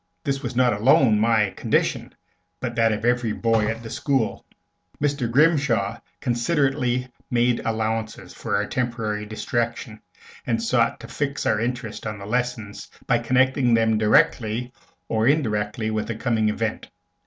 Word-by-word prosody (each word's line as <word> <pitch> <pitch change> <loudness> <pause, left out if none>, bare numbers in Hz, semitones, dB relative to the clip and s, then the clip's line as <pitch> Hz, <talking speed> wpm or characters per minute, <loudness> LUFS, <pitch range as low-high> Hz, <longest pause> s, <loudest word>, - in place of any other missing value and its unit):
This 140 -2 -1
was 125 -3 -5
not 125 -1 +4
alone 110 0 +4
my 110 -2 +3
condition, - - -1 0.4
but - - -3
that 115 -1 +3
of 110 +1 -2
every 120 -2 +1
boy 115 -2 +1
in 115 +1 -7
the 110 - -7
school. 135 -2 -1 0.6
Mr. 140 -4 0
Grimshaw 125 -7 +2 0.2
considerately 125 -1 0 0.2
made 120 0 +2
allowances 110 -4 -2
for 110 -3 -3
our 100 +1 +1
temporary 110 -3 -2
distraction, 115 0 -3 0.5
and 115 -1 +1
sought 115 0 +1
to - - -9
fix 140 -1 -3
our 110 - +2
interest 120 -2 -4
on 105 -1 -4
the 100 - -9
lessons 115 -2 -3 0.2
by 120 -2 +2
connecting 130 +1 +2
them 110 -1 +2
directly 110 +2 +2 0.3
or 110 +1 +1
indirectly 110 -6 0
with 110 -1 -2
the 115 - -3
coming 110 -2 +1
Event. 110 +1 -3
115 Hz, 145 wpm, -23 LUFS, 110-125 Hz, 0.6 s, not